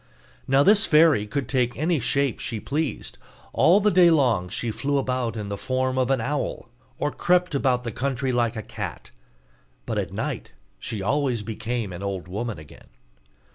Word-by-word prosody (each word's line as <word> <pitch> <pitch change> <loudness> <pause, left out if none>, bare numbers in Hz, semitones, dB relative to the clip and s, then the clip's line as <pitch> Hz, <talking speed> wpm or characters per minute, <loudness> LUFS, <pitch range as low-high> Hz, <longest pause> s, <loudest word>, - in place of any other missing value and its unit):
Now 135 +1 +4
this 205 +4 +5
fairy 150 -9 +5
could 130 +3 -3
take 125 -2 0
any 160 +1 +1
shape 135 +1 0
she 115 -3 -3
pleased. 150 +5 -3 0.3
All 185 +4 +5
the 210 0 +3
day 175 -1 +6
long 120 - +2
she 115 +4 -2
flew 140 +5 -1
about 125 -3 -1
in 105 -2 -5
the 100 - -3
form 130 0 -1
of 130 - +1
an 135 -2 +2
owl, 135 -1 -3 0.3
or 145 - -1
crept 180 -1 +1
about 130 -3 +1
the 115 - -4
country 130 +2 -2
like 120 -1 0
a 110 - -5
cat; - - -7 0.7
but - - -2
at - - -3
night - - -4 0.3
she 105 -3 -5
always 130 -1 0
became 110 -1 -4
an 90 - -7
old 95 -3 -4
woman 105 +3 -4
again. 75 -1 -14
130 Hz, 175 wpm, -24 LUFS, 110-145 Hz, 0.7 s, day